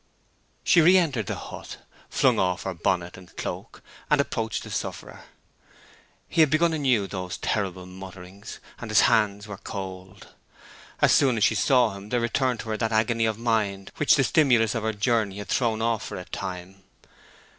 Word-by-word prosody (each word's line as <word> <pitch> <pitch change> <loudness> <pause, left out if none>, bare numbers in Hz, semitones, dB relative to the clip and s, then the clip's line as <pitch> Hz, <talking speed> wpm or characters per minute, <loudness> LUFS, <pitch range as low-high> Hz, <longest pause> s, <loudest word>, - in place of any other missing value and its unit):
She 170 - +5
re 180 +4 +6
entered 135 - 0
the - - -2
hut, - - -9 0.3
flung - - +2
off 90 -1 0
her 95 - -3
bonnet 90 +1 -1
and 90 -1 -16
cloak, - - -6 0.3
and 150 - +3
approached 115 -6 -2
the - - -9
sufferer. - - -6 1.0
He 165 - +2
had 155 - +5
begun 165 +2 +2
anew 130 -9 +2
those 90 -2 -5
terrible 95 -3 -2
mutterings, 95 +2 -10 0.2
and 115 - -7
his 110 - +5
hands 105 -1 +2
were 100 -2 -8
cold. 95 0 -8 0.7
As - - +6
soon 130 -5 +4
as 105 - +1
she - - +4
saw 120 -1 +3
him 100 +1 -10
there 125 - +1
returned 120 +1 0
to 110 - -9
her 110 - -1
that 115 0 -1
agony 115 +1 +2
of 110 -1 -2
mind 110 -4 -1
which 150 - +4
the 135 - +3
stimulus 120 -4 +3
of 115 - -2
her 110 0 -1
journey 105 -2 0
had 105 -2 -7
thrown 115 -3 0
off 115 -2 0
for - - -6
a 90 - -7
time. 95 0 -7
110 Hz, 180 wpm, -25 LUFS, 95-120 Hz, 1.0 s, re